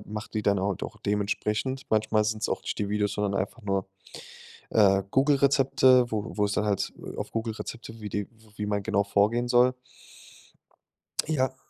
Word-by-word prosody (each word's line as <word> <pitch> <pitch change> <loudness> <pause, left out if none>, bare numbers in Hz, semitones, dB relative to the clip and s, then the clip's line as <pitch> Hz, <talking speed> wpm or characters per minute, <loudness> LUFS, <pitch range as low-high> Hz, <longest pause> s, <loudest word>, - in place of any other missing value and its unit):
mache 105 +1 -6
die 105 - -1
dann 100 -1 +2
halt 100 0 -2
auch - - -5
dementsprechend. 105 +5 -1
Manchmal 110 0 +2
sind's 110 0 -1
auch - - -1
nicht - - -4
die 100 - -1
Videos, 105 0 0
sondern 105 -1 -1
einfach 100 +5 -5
nur, 95 -2 -1 0.8
äh, 100 -2 +4
Google 140 +2 +4
Rezepte, 135 -2 +4
wo 110 0 -3
wo 105 - +3
es 100 - -1
dann 105 - 0
halt, 100 -2 -1
äh, - - -9
auf - - -5
Google 115 -1 -2
Rezepte 115 0 -8
wie 105 - -5
die 105 +1 -2
w 110 -1 -23
wie 105 - -2
man 100 -1 -1
genau 100 -1 +1
vorgehen 105 +4 +2
soll. 125 +1 +5 1.5
Ja. 130 -4 0
105 Hz, 185 wpm, -27 LUFS, 105-120 Hz, 1.5 s, soll